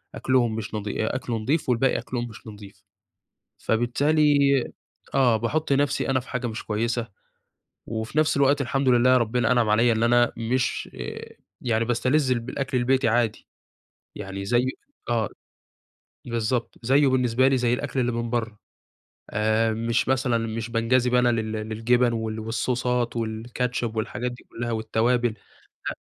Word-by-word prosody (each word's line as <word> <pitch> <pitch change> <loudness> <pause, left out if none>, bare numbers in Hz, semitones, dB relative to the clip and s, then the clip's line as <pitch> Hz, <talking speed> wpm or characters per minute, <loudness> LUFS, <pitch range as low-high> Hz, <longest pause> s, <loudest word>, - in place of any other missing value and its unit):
أكلهم 120 -4 +1
مش 110 -1 -5
نضي 105 +1 -2
أ - - -2
أكله 120 -3 -2
نضيف 135 +7 -1
والباقي 125 +2 +2
أكلهم 120 -1 -4
مش 110 0 -13
نضيف، 100 -2 -12 0.8
فبالتالي، 145 +6 +2 0.8
آه 125 -4 +4
باحط 140 +7 -1
نفْسي 140 0 +1
أنا 130 -1 +2
في 125 - -15
حاجة 125 -1 -3
مش 110 -1 -5
كويسة، 115 +2 -1 0.8
وفي 110 +6 -3
نفْس 155 -1 +3
الوقت 140 +1 +3
الحمد 135 0 0
لله 125 +1 +5
ربنا 120 0 +1
أنعم 120 -3 +2
عليّا 115 +3 +4
إن 110 0 0
أنا 120 +1 +4
مش 120 +2 -1
آآ - - -7 0.2
يعني 115 -2 0
باستلذ 130 +4 +1
الب 120 -1 -1
الأكل 135 -1 -2
البيتي 130 0 +2
عادي، 115 -1 0 0.7
يعني 95 0 -6
زي 120 +4 +2 0.4
آه، 115 -4 +1 1.0
بالضبط، 115 0 -2
زيه 140 +3 +4
بالنسبة 130 -1 +3
لي 135 -1 +3
زي 120 -1 +1
الأكل 135 +1 -2
اللي 120 -1 +1
من 115 0 -3
برّه، 115 -3 -3 0.7
آآ 110 +1 +1
مش 115 +2 0
مثلًا 130 -2 +1
مش 115 0 -4
بانجذب 120 +2 +2
أنا 125 0 +4
لل 110 -2 -1
للجبن 115 +3 +1
وال 110 -1 -3
والصوصات 120 +2 -1
والكاتشب 115 +1 -3
والحاجات 120 +3 -2
دي 120 - -13
كلّها 120 0 -4
والتوابل، 115 +2 +1 0.6
لأ، - - -5
120 Hz, 150 wpm, -25 LUFS, 115-125 Hz, 1.0 s, لله